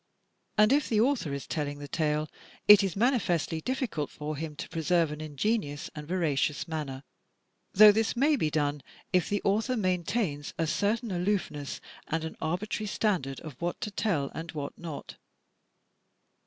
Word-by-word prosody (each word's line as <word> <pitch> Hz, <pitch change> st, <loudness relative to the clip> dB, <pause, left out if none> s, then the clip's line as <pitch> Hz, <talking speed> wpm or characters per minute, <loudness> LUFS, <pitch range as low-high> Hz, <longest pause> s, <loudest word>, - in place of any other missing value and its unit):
And 215 Hz, +4 st, +6 dB
if 290 Hz, 0 st, +2 dB
the 220 Hz, -, +2 dB
author 230 Hz, -, +2 dB
is 140 Hz, 0 st, -4 dB
telling 145 Hz, -2 st, -3 dB
the 145 Hz, 0 st, -7 dB
tale, 150 Hz, 0 st, 0 dB, 0.4 s
it 210 Hz, -1 st, +10 dB
is 195 Hz, -4 st, -1 dB
manifestly 195 Hz, -, +1 dB
difficult 250 Hz, -, -2 dB
for 150 Hz, +1 st, -5 dB
him 155 Hz, +1 st, -5 dB
to -, -, -6 dB
pre 165 Hz, -1 st, -4 dB
serve 165 Hz, -1 st, +2 dB
an 150 Hz, 0 st, -6 dB
ingenuous 155 Hz, 0 st, -2 dB
and 150 Hz, -1 st, -8 dB
veracious 155 Hz, -3 st, 0 dB
manner, 145 Hz, -4 st, -4 dB, 0.7 s
though 210 Hz, +2 st, +10 dB
this 220 Hz, +3 st, 0 dB
may 290 Hz, +5 st, +4 dB
be 160 Hz, -, 0 dB
done 145 Hz, -1 st, 0 dB, 0.3 s
if 180 Hz, -1 st, +3 dB
the 205 Hz, -, -1 dB
author 220 Hz, +6 st, +1 dB
maintains 180 Hz, -5 st, -1 dB
a 165 Hz, -, +1 dB
certain 205 Hz, +8 st, 0 dB
aloofness 175 Hz, -6 st, -1 dB, 0.3 s
and 160 Hz, 0 st, -1 dB
an 160 Hz, -, -5 dB
arbitrary 195 Hz, +6 st, -2 dB
standard 180 Hz, -11 st, -1 dB
of 155 Hz, -4 st, -10 dB
what 175 Hz, 0 st, -2 dB
to 210 Hz, -, -3 dB
tell 180 Hz, -9 st, 0 dB
and 165 Hz, +2 st, -6 dB
what 145 Hz, -2 st, -5 dB
not. 165 Hz, -4 st, -8 dB
170 Hz, 165 wpm, -29 LUFS, 150-210 Hz, 0.7 s, it